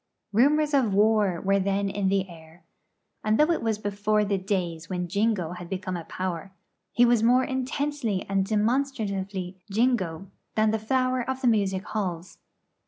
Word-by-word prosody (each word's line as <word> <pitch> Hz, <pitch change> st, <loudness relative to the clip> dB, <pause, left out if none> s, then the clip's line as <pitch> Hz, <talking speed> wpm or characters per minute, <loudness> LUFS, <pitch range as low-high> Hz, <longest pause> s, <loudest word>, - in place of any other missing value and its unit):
Rumours 295 Hz, +6 st, +3 dB
of 240 Hz, -8 st, +2 dB
war 210 Hz, -4 st, +3 dB
were 195 Hz, +1 st, +2 dB
then 195 Hz, +1 st, 0 dB
in 195 Hz, -1 st, -1 dB
the 195 Hz, 0 st, +1 dB
air; 165 Hz, 0 st, -15 dB, 0.6 s
and 215 Hz, +1 st, +2 dB
though 305 Hz, +3 st, +4 dB
it 335 Hz, -, 0 dB
was 225 Hz, -2 st, 0 dB
before 210 Hz, +1 st, 0 dB
the 200 Hz, -1 st, 0 dB
days 175 Hz, -4 st, -3 dB
when 180 Hz, -1 st, -2 dB
Jingo 200 Hz, -2 st, 0 dB
had 180 Hz, -1 st, -8 dB
become 190 Hz, -1 st, -3 dB
a 170 Hz, -2 st, -6 dB
power, 185 Hz, 0 st, -4 dB, 0.4 s
he 245 Hz, -, +4 dB
was 240 Hz, -2 st, +3 dB
more 250 Hz, +3 st, +4 dB
intensely 260 Hz, -5 st, -2 dB
and 195 Hz, -1 st, +1 dB
demonstratively 205 Hz, -5 st, -1 dB
Jingo 195 Hz, -6 st, 0 dB, 0.3 s
than 215 Hz, 0 st, +3 dB
the 220 Hz, -, 0 dB
flower 255 Hz, +3 st, +1 dB
of 265 Hz, 0 st, -3 dB
the 255 Hz, -, +1 dB
music 195 Hz, -4 st, +1 dB
halls. 185 Hz, -6 st, -4 dB
205 Hz, 165 wpm, -26 LUFS, 190-235 Hz, 0.6 s, though